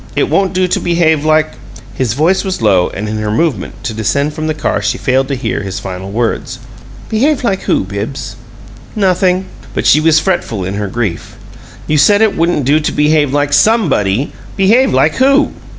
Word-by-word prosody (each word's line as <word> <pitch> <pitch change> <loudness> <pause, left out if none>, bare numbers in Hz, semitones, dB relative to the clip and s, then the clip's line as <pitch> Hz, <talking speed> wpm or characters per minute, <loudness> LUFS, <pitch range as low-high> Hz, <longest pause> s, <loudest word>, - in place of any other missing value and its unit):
It - - 0
won't 195 -2 +1
do 185 0 +1
to - - 0
behave 165 -3 +1
like 155 0 +2 0.2
" 115 +1 -17
His 125 -4 -1
voice 165 +8 +1
was 190 -1 -3
low, 95 -5 +2
and 105 +3 -5
in 110 +1 -3
her 105 0 -2
movement 115 - -2
to 120 - -3
descend 140 +7 -1
from 155 0 -4
the 155 - -1
car 155 - -1
she - - -1
failed 130 0 0
to 140 - -2
hear 130 - -3
his 95 -2 -5
final 95 0 -7
words. 120 +3 -2 0.5
"Behave 265 +7 0
like 195 -5 0
who, - - +2
Bibbs?" 105 +4 -6 0.6
"Nothing." 185 -2 +1 0.3
But - - -2
she 150 - +5
was 160 0 +4
fretful 155 - -2
in 95 - -4
her 105 0 -3
grief. 100 -4 -4 0.5
"You 155 -1 +1
said 205 +8 +4
it 220 - +1
wouldn't 165 -4 0
do 145 +4 +3
to 150 - -2
behave 150 -2 +2
like 145 0 0
SOMEBODY. 145 - +2 0.3
Behave 225 +7 +3
like - - +2
WHO?" 275 +2 +3
150 Hz, 195 wpm, -13 LUFS, 110-180 Hz, 0.6 s, she